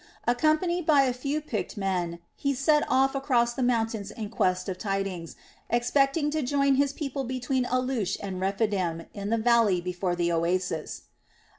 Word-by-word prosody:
Accompanied 310 +7 +1
by 290 -3 +6
a 255 -2 +1
few 280 +4 -2
picked 225 -7 -4
men 180 -4 -1 0.2
he 280 -1 -1
set 295 +3 +3
off 270 +1 +3
across 250 -4 +1
the 260 - -4
mountains 225 -4 0
in 210 -1 -6
quest 185 -4 0
of 185 -1 -4
tidings, 195 -5 -3 0.3
expecting 275 +5 +2
to 310 0 0
join 275 +1 +2
his 280 +1 +2
people 280 -2 -4
between 255 0 -1
Alush 255 -6 0
and 190 -2 -5
Rephidim 190 -4 0
in 200 0 -5
the 230 - +2
valley 225 -5 +3
before 180 0 -2
the 175 0 0
oasis. 170 0 -1
235 Hz, 160 wpm, -27 LUFS, 190-275 Hz, 0.3 s, by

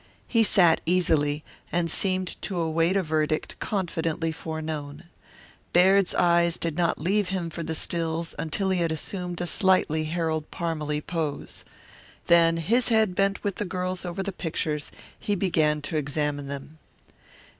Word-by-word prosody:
He 230 - +3
sat 180 -6 +4
easily, 155 -4 +1 0.3
and 170 -1 0
seemed 185 -1 0
to 190 - -4
await 165 +3 +1
a 195 - +1
verdict 155 -1 -1
confidently 165 -4 -1
foreknown. 155 -2 -5 0.7
Baird's 190 +2 +5
eyes 170 -1 +3
did 165 -3 -2
not 170 -1 +1
leave 195 +5 0
him 180 -3 -2
for 170 - -5
the 160 0 -3
stills 165 0 -2
until 190 +5 -1
he 185 - +1
had 165 -1 +1
assumed 175 +2 -4
a - - -1
slightly 175 -5 +3
Harold 160 -1 -2
Parmalee 150 -3 -2
pose. 160 -3 -4 0.6
Then 165 -1 +5
his 230 +10 +1
head 220 -5 +3 0.3
with 200 -2 -2
the - - -1
girl's 185 -1 -3
bent 180 - -4
over 185 +3 -3
the 200 - -3
pictures, 155 -4 -3 0.3
he 205 - -1
began 155 -5 +1
to 155 +2 -2
examine 145 -1 -2
them. 140 +3 -7
165 Hz, 150 wpm, -26 LUFS, 155-185 Hz, 0.7 s, Baird's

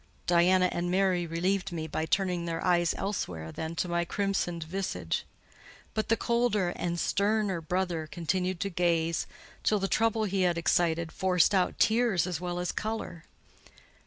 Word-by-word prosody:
Diana 180 +1 +4
and 175 +1 -2
Mary 185 -2 +2
relieved 185 +4 -1
me 160 -2 -3
by 160 +1 -3
turning 180 -1 0
their 165 -1 -3
eyes 175 -2 +3
elsewhere 90 - -3
than 160 +1 -5
to 180 - -1
my 170 0 0
crimsoned 175 -2 -1
visage; 185 +4 -3 0.7
but 215 - -2
the 225 - +3
colder 235 -6 +1
and 175 0 -3
sterner 200 -3 +1
brother 175 -1 -1
continued 180 +2 -2
to 200 - -1
gaze, 170 -2 +1 0.3
till 215 - +2
the 195 -1 -1
trouble 225 +1 +2
he 195 -2 0
had 175 -2 +2
excited 170 -1 +1
forced 185 0 +2
out 185 -2 +2
tears 220 -6 +3
as 180 -2 -3
well 175 -1 -3
as 180 -1 -1
colour. 215 -6 -4
180 Hz, 160 wpm, -29 LUFS, 170-195 Hz, 0.7 s, Diana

